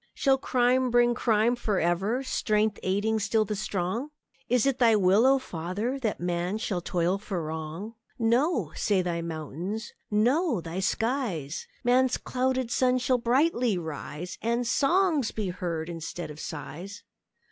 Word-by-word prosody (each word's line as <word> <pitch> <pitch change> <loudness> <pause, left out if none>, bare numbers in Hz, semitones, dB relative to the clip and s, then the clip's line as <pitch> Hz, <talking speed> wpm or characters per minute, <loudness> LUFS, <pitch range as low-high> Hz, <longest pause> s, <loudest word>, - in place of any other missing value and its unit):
Shall 270 -2 +3
crime 255 0 +2
bring 240 0 +4
crime 230 0 +2
for 215 -5 -1
ever, 195 +10 0
Strength 215 -5 0
aiding 205 +4 0
still 215 +1 +1
the 210 - -3
strong? 200 +6 -2 0.4
Is 250 0 +3
it 270 -2 +1
Thy 230 -3 +5
will, 200 +4 +4
O 270 +1 +5
Father! 205 +5 -3
That 225 -5 -2
man 175 +3 -1
shall 200 -5 -2
toil 175 +2 0
for 190 -5 -4
wrong? 160 +7 -5 0.2
"No!" 235 - +1
say 195 -3 +1
Thy 170 -1 -2
mountains; 170 - -5 0.2
"No!" 245 - +2
Thy 165 +2 -5
skies; 195 - -1 0.2
"Man's 255 +1 +3
clouded 255 -1 -1
sun 255 0 +3
shall 255 0 +1
brightly 245 - +2
rise, 160 +1 -6
And 235 +2 0
songs 300 - +2
be 210 -4 -3
heard 170 -3 -3
instead 165 -1 -6
of 150 - -11
sighs." 175 +7 -7
215 Hz, 145 wpm, -27 LUFS, 175-250 Hz, 0.4 s, Thy